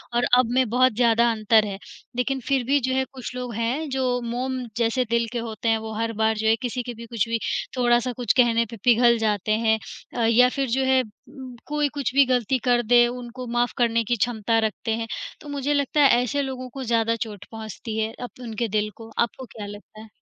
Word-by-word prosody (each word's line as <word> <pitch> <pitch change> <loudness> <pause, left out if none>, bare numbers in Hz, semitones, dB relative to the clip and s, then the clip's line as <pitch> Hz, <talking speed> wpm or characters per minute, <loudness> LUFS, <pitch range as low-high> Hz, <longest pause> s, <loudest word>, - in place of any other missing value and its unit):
और 240 - +2
अब 250 -2 +3
में 260 0 +3
बहुत 255 0 +3
ज़्यादा 235 -1 +4
अंतर 220 0 +3
है। 200 -2 -5 0.4
लेकिन 255 +2 0
फिर 270 -3 +2
भी 280 +3 +3
जो 260 0 -1
है 265 - +1
कुछ 255 -1 -7
लोग 250 -1 -5
हैं 250 +7 -1
जो 255 -2 0
मोम 255 +2 -2 0.2
जैसे 235 +2 +1
दिल 235 0 +2
के 240 - -1
होते 230 0 -3
हैं, 225 - +3
वो 220 0 -6
हर 230 0 -1
बार 220 0 +3
जो 220 0 -1
है 225 - +5
किसी 250 0 -3
के 245 -1 -6
भी 230 +1 -10
कुछ 230 -2 -1
भी 230 0 0 0.4
थोड़ा-सा 240 0 +2
कुछ 240 -3 0
कहने 235 -2 +4
पे 230 +1 -10
पिघल 235 -1 +5
जाते 215 -2 0
हैं 220 0 +2 0.4
अ, 235 -2 +1
या 245 +2 +5
फिर 275 0 -2
जो 265 +3 +1
है 260 0 +4
उ 255 +4 -12
कोई 295 0 +1
कुछ 280 -3 -3
भी 280 - +7
गलती 255 0 +1
कर 245 -1 +3
दे 240 0 +6
उनको 250 +1 -7
माफ़ 240 0 +1
करने 230 -1 +2
की 240 +2 0
क्षमता 225 0 0
रखते 220 0 -2
हैं, 230 0 -4 0.3
तो 295 - -10
मुझे 285 0 -1
लगता 285 +1 +1
है 280 - +7
ऐसे 285 +3 -1
लोगों 255 -2 -5
को 270 -1 -5
ज़्यादा 230 -1 +1
चोट 210 -3 -6
पहुँचती 220 0 -6
है 220 +1 -1
अप 245 - -9
उनके 230 -1 -3
दिल 210 0 0
को 225 -1 -11
आपको 235 +2 -1
क्या 210 -2 -6
लगता 205 +1 -11
है? 220 - -12
240 Hz, 230 wpm, -24 LUFS, 225-255 Hz, 0.4 s, भी